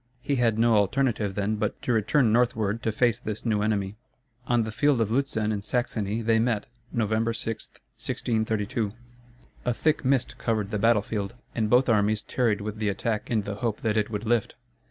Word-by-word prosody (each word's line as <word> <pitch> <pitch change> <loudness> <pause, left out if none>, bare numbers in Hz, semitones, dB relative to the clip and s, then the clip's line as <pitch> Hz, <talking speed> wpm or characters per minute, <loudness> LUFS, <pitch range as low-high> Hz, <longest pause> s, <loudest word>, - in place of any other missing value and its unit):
He 140 +1 0
had 115 -3 +2
no 115 -1 +4
alternative 105 -1 +1
then 105 +1 0
but - - -2
to 125 - +1
return 115 +2 +3
northward 115 -2 +1
to 110 - 0
face 120 +1 +2
this 110 +1 -5
new 105 -3 +1
enemy. 105 -1 -1 0.5
On 120 -1 +3
the 110 - -4
field 145 +3 +2
of 110 -2 +1
Lutzen 115 -4 0
in 105 -2 -2
Saxony 110 -1 -1
they 110 0 +3
met 115 -3 +1 0.3
November 110 0 0
6, 115 0 -4
1632. 110 -1 -2 0.7
A 125 - +1
thick 155 +4 +1
mist 130 -2 +1
covered 110 -3 -1
the 105 - -1
battle 115 -1 +4
field, 105 +1 -4 0.2
and 110 -2 0
both 125 +4 +4
armies 105 -2 +2
tarried 115 -5 0
with 105 +1 -5
the 105 -2 +1
attack 105 +2 -2
in 110 -3 +1
the 100 0 -5
hope 115 -3 -2
that 110 -2 0
it 105 -1 +1
would 105 0 -4
lift. 115 -1 +1
110 Hz, 190 wpm, -26 LUFS, 105-120 Hz, 0.7 s, no